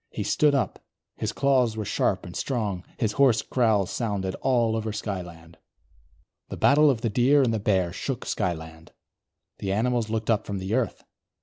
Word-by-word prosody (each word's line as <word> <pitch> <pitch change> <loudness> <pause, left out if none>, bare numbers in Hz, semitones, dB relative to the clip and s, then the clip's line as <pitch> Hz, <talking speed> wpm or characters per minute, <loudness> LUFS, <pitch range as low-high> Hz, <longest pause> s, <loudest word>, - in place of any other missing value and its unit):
He - - -4
stood 150 -2 +3
up; 125 -8 -1 0.4
his - - -2
claws 130 -5 +2
were 110 - -3
sharp - - 0
and - - -9
strong; 105 -8 -2
his 110 -4 0
hoarse 130 -4 +3
growls 110 -6 +1
sounded 100 -5 -2
all 120 -4 +2
over 110 -1 -2
Skyland. 90 -6 -6 0.9
The - - -6
battle 150 +1 +5
of 120 -5 0
the 115 - 0
Deer 135 +6 +4
and 115 -3 +1
the 110 - 0
Bear 95 -4 +1
shook 130 +5 -4
Skyland. 80 -2 -4 0.7
The 95 - -2
animals 115 +2 0
looked 110 +1 -1
up 110 - 0
from 100 - -3
the 95 +2 -4
earth. 120 -4 -1
110 Hz, 175 wpm, -25 LUFS, 95-125 Hz, 0.9 s, battle